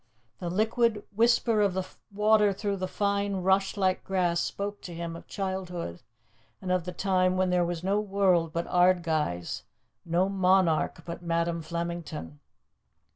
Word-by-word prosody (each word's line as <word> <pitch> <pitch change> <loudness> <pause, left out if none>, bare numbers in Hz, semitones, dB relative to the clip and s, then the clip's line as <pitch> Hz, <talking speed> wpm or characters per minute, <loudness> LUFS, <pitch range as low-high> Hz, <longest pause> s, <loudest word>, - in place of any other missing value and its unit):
The 175 - -3
liquid 220 +3 +1
whisper 230 -1 +3
of 200 -3 +2
the 190 -1 -2 0.2
water 210 0 +4
through 200 0 -2
the 185 0 -2
fine, 200 -1 -1
rushlike 190 0 +2
grass 180 -3 +1
spoke 205 +1 -4
to 175 - -8
him 170 0 -5
of 170 - -11
childhood 185 - -4 0.6
and 185 - -4
of 180 -2 +1
the 180 - -4
time 185 0 +1
when 185 -1 +2
there 180 -1 +3
was 175 0 -3
no 195 +2 +1
world 190 -5 +2
but 170 +1 -2
Ardguys, 165 - +1 0.4
no 175 +3 +1
monarch 185 -4 +2
but 170 0 -6
Madam 170 0 -1
Flemington. 170 - -5
185 Hz, 145 wpm, -28 LUFS, 170-200 Hz, 0.6 s, water